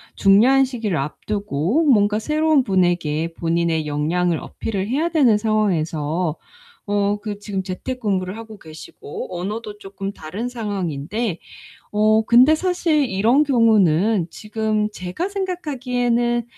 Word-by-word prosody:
중요한 245 +8 +5
시기를 225 -9 -3
앞두고 200 - -1
뭔가 210 -6 +3
새로운 305 +3 +2
분에게 175 -5 0
본인의 165 -1 0
역량을 160 +3 0
어필을 200 -3 -4
해야 305 +8 0
되는 265 -10 +4
상황에서 170 -6 0 0.5
어 205 0 +1
그 205 -2 -5
지금 200 -2 -4
재택근무를 190 -1 -3
하고 220 -1 -10
계시고 160 +1 -9
언어도 210 +3 -5
쪼끔 195 0 -6
다른 200 +11 -5
상황인데, 200 - -3 0.6
어 215 +1 +3
근데 250 +7 +6
사실 335 -3 +1
이런 230 +8 +3
경우는 215 - +3
지금 215 0 -2
제가 185 - -4
생각하기에는 250 - -1
210 Hz, 285 characters per minute, -21 LUFS, 180-240 Hz, 0.6 s, 근데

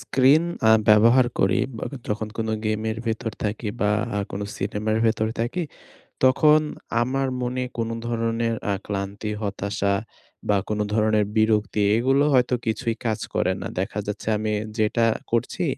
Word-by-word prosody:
Screen 135 +4 +4 0.3
আ - - +7 0.2
ব্যবহার 115 +4 +6
করি, - - +3 0.2
বা - - -4 0.2
যখন 105 +1 -2
কোনো 110 -1 -1
গেমের 110 +1 -1
ভেতর 110 0 -2
থাকি 105 +1 -2
বা 105 - +2 0.3
আ - - +1
কোন 95 - -4 0.2
সিনেমার 105 +2 -1
ভেতর 110 -1 +1
থাকি 125 +10 -1 0.6
তখন 150 +4 +5 0.4
আমার 135 +2 0
মনে 125 +1 -2 0.2
কোন 115 -1 -1 0.2
ধরনের 115 0 0 0.2
আ - - +2
ক্লান্তি 100 +1 -4
হতাশা 100 0 -1 0.6
বা 105 - +4
কোন 105 0 -1
ধরণের 110 -1 +2
বিরক্তি 110 -1 +2
এগুলো 135 +4 +3
হয়তো 125 -1 +3
কিছুই 115 +1 -1
কাজ 110 -2 0
করে - - +1
না। - - -3
দেখা 100 +2 -2
যাচ্ছে 105 -1 -5
আমি 110 0 -2 0.3
যেটা 110 +1 +2 0.3
করছি 115 -1 0
110 Hz, 150 wpm, -24 LUFS, 105-120 Hz, 0.6 s, আ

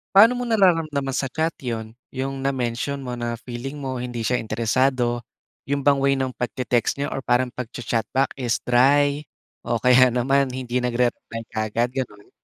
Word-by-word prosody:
Paano 225 +5 +8
mo 245 - -3
nararamdaman 165 - +2
sa 135 0 -1
chat 160 +3 -1
'yon? 115 -3 -4 0.2
Yung 135 0 -4
na-mention 130 0 -1
mo 130 -3 -6
na 120 -1 -3
feeling 130 +4 -6
mo 130 -3 -4
hindi 120 -2 -4
siya 125 +2 +1
interesado. 120 +2 +1 0.5
Yun 140 -1 -1
bang 140 -1 +4
way 135 0 +3
ng 130 -1 -2
pagte-text 125 0 -1
niya 140 - -2
or 135 - -3
parang 125 0 +1
pagcha-chat 115 -2 -3
back 135 +1 +1
is 125 -3 -1
dry, 140 +4 +4 0.4
o 120 -1 -1
kaya 125 +1 +6
naman 135 +3 +2
hindi 125 -1 -2
nagre-reply 120 -2 -1
kaagad 115 +3 -1
gano'n? 105 -6 -5
125 Hz, 165 wpm, -23 LUFS, 120-140 Hz, 0.5 s, Paano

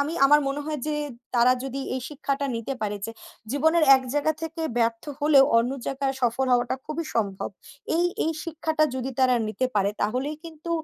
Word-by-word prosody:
আমি, 300 +4 -1
আমার 295 +1 +6
মনে 280 +1 -2
হয় 305 -2 -2
যে 305 - 0 0.4
তারা 245 +1 +5
যদি 270 +1 -4
এই 260 - -2
শিক্ষাটা 280 -1 -2
নিতে 230 +4 -4
পারে 205 -1 -1
যে, - - -5 0.4
জীবনের 320 +3 +3
এক 260 - -3
জায়গা 305 +2 +2
থেকে 325 +1 -5 0.2
ব্যর্থ 230 0 +1 0.2
হলেও, 290 -2 +6
অন্য 240 +2 +1 0.2
জায়গায় 270 0 -1
সফর 245 +2 +1
হওয়াটা 245 +1 +2
খুবই 315 +2 -3
সম্ভব। 200 -4 -1 0.5
এই, 345 - +2 0.2
এই 325 - +1
শিক্ষাটা 315 -1 0
যদি 260 +1 -3
তারা 255 -1 +5
নিতে 255 +4 -1
পারে 200 0 +2
তাহলেই 255 +8 -1
কিন্তু 325 +1 -8
275 Hz, 185 wpm, -25 LUFS, 245-310 Hz, 0.5 s, আমার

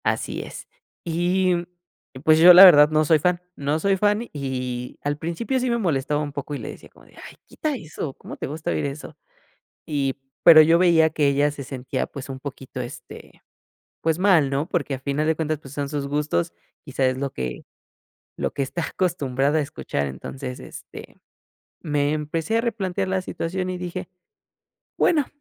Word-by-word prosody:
Así - - -1
es. - - -9 0.4
Y, 180 +2 +1 0.7
pues, 155 0 +5
yo, 175 +2 +10
la 185 +2 +11
verdad 150 -5 +8
no 155 0 +2
soy 155 0 +4
fan, 180 +3 +1
no 145 +2 -1
soy 195 +3 +2
fan. 210 +4 +1
Y, 125 -3 -4
al 145 0 -1
principio 170 - -2
sí 255 0 -1
me 235 - +1
molestaba 150 - 0
un 145 -1 -4
poco 145 +1 -5
y - - -3
le - - -6
decía - - -11
como - - -21
de: - - -22
"Ay, - - -11
quita 305 -2 -3
eso, 155 - -6
¿cómo - - -10
te - - -4
gusta 150 +3 -4
oír - - -1
eso?". 140 +1 -6 0.7
Y, 140 -4 -1 0.3
pero 160 -2 +10
yo 165 +2 +5
veía 170 -3 +5
que 155 -2 +1
ella 145 +1 +2
se 145 -1 -7
sentía, 130 -1 -4
pues, 140 -1 -9
un 130 -1 -6
poquito, 130 -2 -7
este, 120 - -11 0.6
pues, 160 +1 0
mal, 180 -8 +4
¿no? 140 +3 -1
Porque 145 -5 -2
a - - -9
final 140 +3 -1
de 160 - +2
cuentas, 155 -1 -2
pues, 135 -2 -12
son 145 -1 -3
sus 145 -1 -3
gustos, 145 - -1 0.3
quizá 135 - -1
es 130 0 +1
lo 140 0 -3
que 65 -1 -5 0.7
lo - - -2
que 140 - -2
está 155 +6 -3
acostumbrada 145 -5 0
a - - +2
escuchar. 70 - -3
Entonces, 125 - -7
este, - - -11 0.7
me 145 -2 0
empecé 155 +8 -1
a - - +2
replantear 195 -5 -2
la 190 0 0
situación 185 +1 -4
y 185 - -3
dije: 180 +1 -5 0.9
"Bueno, 300 -5 +3
155 Hz, 185 wpm, -23 LUFS, 140-180 Hz, 0.9 s, la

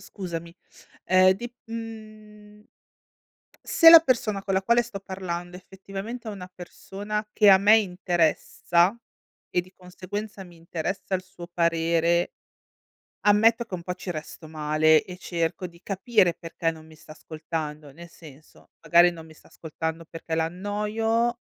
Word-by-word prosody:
scusami, 170 -4 -7 0.5
uhm, 185 0 +5
dip 240 +5 -8
uhm 215 -2 -10 1.0
se 330 - +7
la 330 0 +11
persona 230 -9 0
con 195 -1 -2
la 190 - +1
quale 235 +4 +3
sto 235 -4 -8
parlando 180 -2 -6
effettivamente 195 +5 -8
è - - -3
una 185 -2 -9
persona 205 +4 -6
che 210 -2 +6
a 190 - +8
me 205 +3 +6
interessa, 180 -1 +1 0.6
e 180 - +2
di 185 +1 -17
conseguenza 195 +3 -7
mi 175 -2 -16
interessa 170 +4 -4
il 185 - -9
suo 185 -2 -12
parere 170 +1 +1 0.9
ammetto 225 +3 +4
che 215 - -14
un 170 - -9
po' 180 - -3
ci 180 0 -6
resto 155 0 -8
male 155 0 +2
e 180 -1 -10
cerco 170 0 -3
di 170 +1 -18
capire 195 -2 +1
perché 165 -1 -3
non 160 -1 -13
mi 160 - -16
sta 155 - -16
ascoltando. 155 -1 -6
Nel 170 +5 -12
senso, 155 -3 -17
magari 175 +1 +5
non 165 -2 -11
mi 160 - -15
sta - - -21
ascoltando 160 +1 -6
perché 165 0 -7
l'annoio, 210 +7 -1
185 Hz, 150 wpm, -25 LUFS, 165-210 Hz, 1.0 s, la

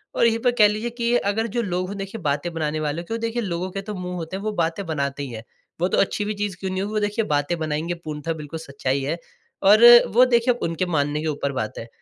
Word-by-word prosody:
और - - +3
यहीं 230 0 +3
पे 245 +1 +2
कह 210 - +8
लीजिए 215 +3 -2
कि 240 0 0
अगर 220 +1 0
जो 240 - +2
लोग 185 -3 -2
हो - - -4
देखिए 195 +2 -6
बातें 145 +2 -1
बनाने 155 -1 -2
वाले, 155 +2 -2
तो 225 +6 -4
देखिए 230 +1 -2
लोगों 185 -3 -3
के 195 - -4
तो 210 +1 -6
मुँह 180 -1 -5
होते 165 +1 -5
हैं, 195 - -8
वो 215 - -1
बातें 170 +1 -1
बनाते 140 -3 -2
ही 140 - -5
हैं। 110 -1 -7 0.4
वो 180 - +3
तो - - 0
अच्छी 205 +1 +1
भी 210 - -2
चीज़ 205 -3 -3
क्यों 190 -1 -3
नहीं 185 0 -2
हो, 215 +1 -1
देखिए 210 +2 0
बातें 145 +2 0
बनाएँगे 155 +2 -2
पूर्णतः 155 +1 -3
बिल्कुल 155 0 -7
सच्चाई 140 -3 -2
है, 150 +5 -1 0.5
और 210 +4 +6 0.3
वो 250 +3 +7
देखिए 245 0 +3
उनके 165 +2 -1
मानने 150 -3 0
के 160 - -3
ऊपर 145 -2 -1
बात 110 -5 -4
है। 115 - -7
180 Hz, 255 wpm, -23 LUFS, 150-210 Hz, 0.5 s, कह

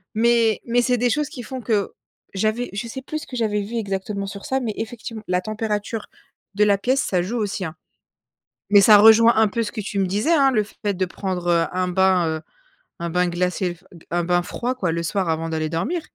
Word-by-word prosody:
Mais 230 -1 +3
mais 240 +1 +3
c'est 250 0 +2
des 245 +1 +1
choses 295 +5 0
qui 250 - -8
font 255 +3 -6
que 210 -4 0 0.4
j'avais 220 +5 0
je 220 +4 -4
sais 265 +3 -6
plus 310 +4 -5
ce - - -10
que 250 - -6
j'avais 210 -3 0
vu 230 +4 -5
exactement 200 -1 -3
sur 200 0 -8
ça, 265 - 0
mais, 230 -5 -3
effectivement, 225 -1 -6
la 180 0 +1
température 215 +1 -3 0.5
de 210 - +4
la 200 -1 +4
pièce, 260 +7 +1
ça 180 -7 0
joue 230 +6 -3
aussi, 205 -3 -2
hein. 160 -1 -6 1.1
Ça 210 +1 +8
rejoint 225 +2 +7
un 220 - +5
peu 230 +3 -1
ce 210 - -5
que 215 - -4
tu 205 0 -5
me 195 - +2
disais, 210 - +1
hein, 275 -4 +4
le 215 -4 +2
fait 205 0 -4
de 185 +1 0
prendre, 180 -1 -4
heu, 170 -1 +3
un 185 0 0
bain, 185 -1 +3
heu 160 0 -2 0.6
un 170 0 -3
bain 180 +1 +1
glacé, 180 0 -1 0.3
un 175 0 0
bain 175 0 +2
froid, 245 +7 -3
quoi, 180 -9 -1
le 170 0 -2
soir 185 +2 -1
avant 165 0 -1
d'aller 155 -1 -1
dormir. 175 - -2
205 Hz, 225 wpm, -22 LUFS, 180-230 Hz, 1.1 s, Ça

